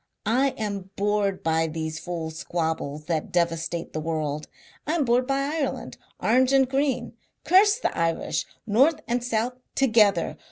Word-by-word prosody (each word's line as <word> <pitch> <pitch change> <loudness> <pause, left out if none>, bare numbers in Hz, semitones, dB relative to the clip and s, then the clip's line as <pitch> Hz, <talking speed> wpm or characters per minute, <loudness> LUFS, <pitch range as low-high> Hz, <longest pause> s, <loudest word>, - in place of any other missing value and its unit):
I 255 +5 +2
am 200 -3 -4
bored 200 -1 0
by 160 0 +2
these 160 0 -4
fools' 165 -2 -5
squabbles 160 -3 -3
that 160 -2 -2
devastate 170 -1 -1
the 155 - -2
world. 155 -2 -3 0.4
I 310 - +1
am 305 -5 +1
bored 245 +1 +2
by 275 0 +1
Ireland, 290 +1 -3 0.2
Orange 255 +3 +3
and 270 -1 +5
Green. 270 0 -1 0.3
Curse 405 +4 +5
the - - -2
Irish 165 -1 -1 0.2
north 265 +9 +3
and 240 0 0
south 240 0 0 0.2
together! 215 -9 +3
205 Hz, 150 wpm, -25 LUFS, 165-260 Hz, 0.4 s, and